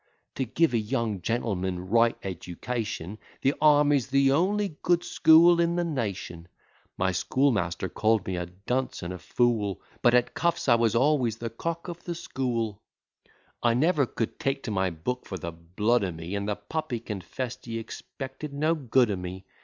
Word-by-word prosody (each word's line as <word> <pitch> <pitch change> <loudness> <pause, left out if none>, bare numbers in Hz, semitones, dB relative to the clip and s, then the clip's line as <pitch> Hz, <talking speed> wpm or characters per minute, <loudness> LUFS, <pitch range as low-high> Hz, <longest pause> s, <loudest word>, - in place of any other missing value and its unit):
To 130 - -2
give 150 +4 +2
a 115 - +3
young 110 -3 -2
gentleman 95 -4 -2
right 115 +3 +3
education, 100 +1 -4 0.2
The 135 - +4
army's 145 -4 +5
the 135 0 +3
only 190 +3 +1
good 175 0 +2
school 165 +2 +6
in 170 0 +2
the 175 - +1
nation: 100 - -4 0.5
My 95 +1 +1
schoolmaster 100 -6 +1
call'd 110 +2 +1
me 95 - -2
a 90 0 -3
dunce 105 +9 -3
and 85 +1 -4
a 90 - -7
fool, 105 0 0 0.2
But 120 0 +5
at 125 -1 +2
cuffs 170 -2 0
I 120 - +7
was 115 -1 +2
always 125 -3 +2
the 115 -1 -5
cock 170 +9 -4
of 175 -1 -7
the 175 - -4
school; 120 -9 -2 0.8
I 120 -1 +3
never 145 0 +3
could 115 - -4
take 135 0 -1
to 110 - -4
my 95 -2 +1
book 90 +10 -4
for 95 - -4
the 85 0 -5
blood 95 +8 0
o' 95 - -1
me, 80 +3 -7
And 100 +1 -2
the 105 - 0
puppy 125 +4 -4
confess'd 115 +5 -6
he 115 0 -3
expected 135 +5 -7
no 155 +3 +2
good 130 -6 +2
o' - - 0
me. 90 +1 -7
115 Hz, 175 wpm, -27 LUFS, 95-140 Hz, 0.8 s, I